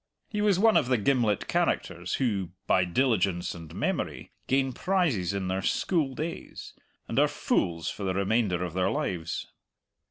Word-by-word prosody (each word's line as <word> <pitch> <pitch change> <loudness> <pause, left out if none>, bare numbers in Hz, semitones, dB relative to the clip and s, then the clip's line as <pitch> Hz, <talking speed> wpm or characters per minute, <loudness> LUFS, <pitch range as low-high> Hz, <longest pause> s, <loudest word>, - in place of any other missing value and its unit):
He 210 -1 -2
was 205 -3 +3
one 220 +2 +5
of 130 - +2
the 125 -1 +3
gimlet 115 -2 +1
characters 85 +1 0
who, 100 -9 0 0.2
by 90 - +3
diligence 95 -4 +1
and 80 -2 -10
memory, - - -2 0.2
gain 135 -1 +2
prizes 155 - +1
in 100 -2 -2
their 95 +1 -1
school 145 - 0
days 160 +4 -6 0.3
and - - 0
are - - +5
fools 85 -1 0
for 100 - -7
the 95 -1 -1
remainder 100 -2 +1
of 90 -2 -4
their 90 0 +1
lives. 85 -2 -2
100 Hz, 160 wpm, -28 LUFS, 90-135 Hz, 0.3 s, one